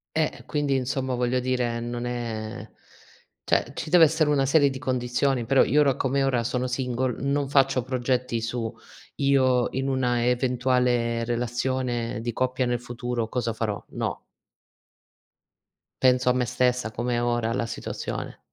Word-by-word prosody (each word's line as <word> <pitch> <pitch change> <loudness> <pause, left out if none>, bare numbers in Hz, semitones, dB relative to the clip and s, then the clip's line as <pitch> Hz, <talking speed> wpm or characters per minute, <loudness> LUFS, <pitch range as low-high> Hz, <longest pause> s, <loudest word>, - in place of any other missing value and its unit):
Eh, 160 -1 +2
e - - -14
quindi 145 -3 0
insomma, 130 0 -1
voglio 125 +1 +1
dire, 125 -2 -1
non 120 +1 -4
è 115 -2 -4 0.8
cioè, - - +1
ci - - -5
deve 175 -2 +8
essere 155 0 +2
una 140 -2 +2
serie 145 0 +4
di 130 - -6
condizioni, 125 -1 0
però 135 +3 +5
io 150 - +3
ora 140 -3 +3
come 135 +1 0
ora 130 -3 +1
sono 125 +2 -1
single, 125 -1 -2
non 140 0 0
faccio 135 -2 +3
progetti 125 -1 -1
su 115 0 -3 0.4
io 130 -3 +3
in 135 +1 -2
una 125 -3 +1
eventuale 125 -1 +1
relazione 120 0 -2
di 120 0 -3
coppia 130 +1 0
nel 120 0 0
futuro 120 -1 -3
cosa 120 0 -2
farò, 110 -2 -3
no. - - -4 1.8
Penso 125 -1 +4
a - - +4
me 125 0 +1
stessa, 125 -1 0
come 120 +2 -2
è 120 - 0
ora 120 -1 0
la 115 - -1
situazione. 115 - -5
125 Hz, 155 wpm, -25 LUFS, 120-130 Hz, 1.8 s, deve